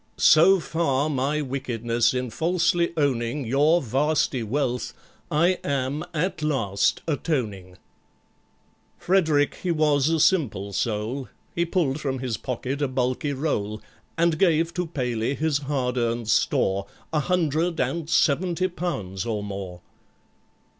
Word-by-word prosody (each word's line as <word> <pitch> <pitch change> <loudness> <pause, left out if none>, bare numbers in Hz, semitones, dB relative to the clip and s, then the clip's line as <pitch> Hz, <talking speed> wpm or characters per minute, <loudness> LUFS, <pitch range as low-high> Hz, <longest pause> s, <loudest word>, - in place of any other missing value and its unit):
So 185 +5 +6
far 155 -2 0
my 145 +3 0
wickedness 120 -4 0
in 125 -2 -3
falsely 170 +3 +1
owning 135 -2 0
Your 145 +8 +3
vasty 135 +1 +1
wealth, 125 +1 -2 0.3
I 175 +4 +2
am 140 +2 -1
at 180 +2 -2
last 115 -10 0
atoning!" 110 - -2 1.2
FREDERICK 160 -6 +2
he 185 - -2
was 150 -3 +2
a 165 -1 +1
simple 115 - +1
soul, 115 +6 -2 0.2
He 170 - 0
pulled 155 -5 0
from 135 -2 -2
his 125 -3 -3
pocket 130 +3 -4
a 145 - +2
bulky 130 +2 -1
roll, 110 -7 -2 0.4
And 165 -1 +2
gave 165 -2 +3
to 180 -1 -2
PALEY 125 -4 -2
his 155 -1 0
hard 130 -3 -1
earned 115 -1 -1
store, 100 -2 +1 0.3
A 155 - +2
hundred 165 +1 0
and 165 -2 -1
seventy 175 +5 +2
pounds 135 - -4
or 110 -3 -2
more. 95 -3 -6
140 Hz, 125 wpm, -24 LUFS, 120-160 Hz, 1.2 s, So